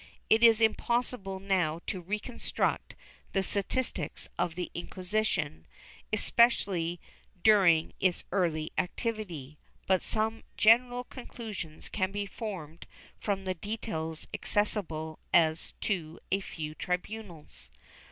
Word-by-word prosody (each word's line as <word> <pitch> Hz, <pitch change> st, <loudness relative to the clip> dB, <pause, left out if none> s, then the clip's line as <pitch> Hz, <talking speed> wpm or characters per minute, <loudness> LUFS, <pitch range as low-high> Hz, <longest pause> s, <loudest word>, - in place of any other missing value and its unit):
It 220 Hz, +1 st, +6 dB
is 230 Hz, -1 st, +7 dB
impossible 225 Hz, -3 st, +1 dB
now 185 Hz, -5 st, +1 dB
to 185 Hz, -, -3 dB
reconstruct 210 Hz, +6 st, -2 dB, 0.4 s
the 195 Hz, -, +2 dB
statistics 210 Hz, +7 st, 0 dB
of 165 Hz, -, -1 dB
the 180 Hz, 0 st, -4 dB
Inquisition, 180 Hz, -, -2 dB, 0.4 s
especially 200 Hz, -6 st, +3 dB, 0.4 s
during 185 Hz, -7 st, +5 dB
its 185 Hz, -2 st, +2 dB
early 165 Hz, -5 st, 0 dB
activity, 180 Hz, -, -3 dB, 0.3 s
but 190 Hz, -1 st, +3 dB
some 220 Hz, +1 st, 0 dB, 0.2 s
general 245 Hz, +3 st, +5 dB
concliLsions 215 Hz, -, -7 dB
can 185 Hz, -2 st, 0 dB
be 205 Hz, 0 st, -2 dB
formed 180 Hz, -6 st, -7 dB, 0.3 s
from 195 Hz, -2 st, -2 dB
the 185 Hz, -, 0 dB
details 165 Hz, -4 st, -4 dB
accessible 165 Hz, -7 st, -1 dB, 0.2 s
as 160 Hz, -1 st, +3 dB
to 170 Hz, -5 st, -2 dB
a 195 Hz, -, +3 dB
few 155 Hz, -5 st, -6 dB
tribunals. 180 Hz, -, -5 dB
190 Hz, 105 wpm, -30 LUFS, 165-215 Hz, 0.4 s, is